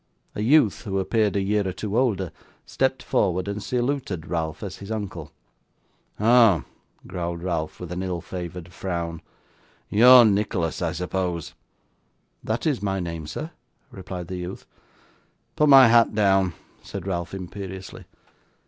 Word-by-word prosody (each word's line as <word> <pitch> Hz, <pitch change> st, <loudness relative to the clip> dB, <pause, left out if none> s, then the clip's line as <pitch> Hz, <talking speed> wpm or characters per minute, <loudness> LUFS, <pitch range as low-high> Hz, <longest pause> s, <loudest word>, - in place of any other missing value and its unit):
A -, -, -4 dB
youth, 120 Hz, -2 st, +4 dB
who 100 Hz, -4 st, -3 dB
appeared 105 Hz, +1 st, +1 dB
a 100 Hz, -, +2 dB
year 100 Hz, 0 st, 0 dB
or -, -, -1 dB
two 100 Hz, +3 st, -5 dB
older, 105 Hz, -, +1 dB, 0.3 s
stepped 130 Hz, 0 st, -1 dB
forward 95 Hz, -1 st, 0 dB
and 100 Hz, +1 st, -3 dB
saluted 125 Hz, -, -2 dB
Ralph 80 Hz, +1 st, -3 dB
as 95 Hz, -3 st, -6 dB
his 100 Hz, -, -10 dB
uncle. 95 Hz, -8 st, -5 dB, 0.9 s
'Oh,' 110 Hz, -, +5 dB, 0.4 s
growled 85 Hz, -1 st, -4 dB
Ralph, 85 Hz, -4 st, -3 dB
with 90 Hz, -1 st, -7 dB
an 90 Hz, +1 st, -3 dB
ill 90 Hz, -2 st, -3 dB
favoured 90 Hz, 0 st, -7 dB
frown, 85 Hz, -3 st, -4 dB, 0.7 s
'you 110 Hz, +4 st, +5 dB
are 125 Hz, -2 st, +10 dB
Nicholas, 100 Hz, -6 st, 0 dB
I 85 Hz, -2 st, 0 dB
suppose?' 90 Hz, -1 st, -3 dB, 0.9 s
'That 110 Hz, +1 st, -2 dB
is 145 Hz, -10 st, 0 dB
my 95 Hz, -1 st, -1 dB
name, 85 Hz, -3 st, -5 dB
sir,' 155 Hz, -, -6 dB, 0.4 s
replied 90 Hz, -2 st, -7 dB
the 95 Hz, -, -5 dB
youth. 90 Hz, +1 st, -7 dB, 0.9 s
'Put 150 Hz, -1 st, +3 dB
my 135 Hz, -3 st, +9 dB
hat 115 Hz, -2 st, +4 dB
down,' 95 Hz, -4 st, +3 dB, 0.3 s
said -, -, -7 dB
Ralph, 85 Hz, -1 st, -3 dB
imperiously. 95 Hz, 0 st, -8 dB
95 Hz, 145 wpm, -24 LUFS, 90-110 Hz, 0.9 s, are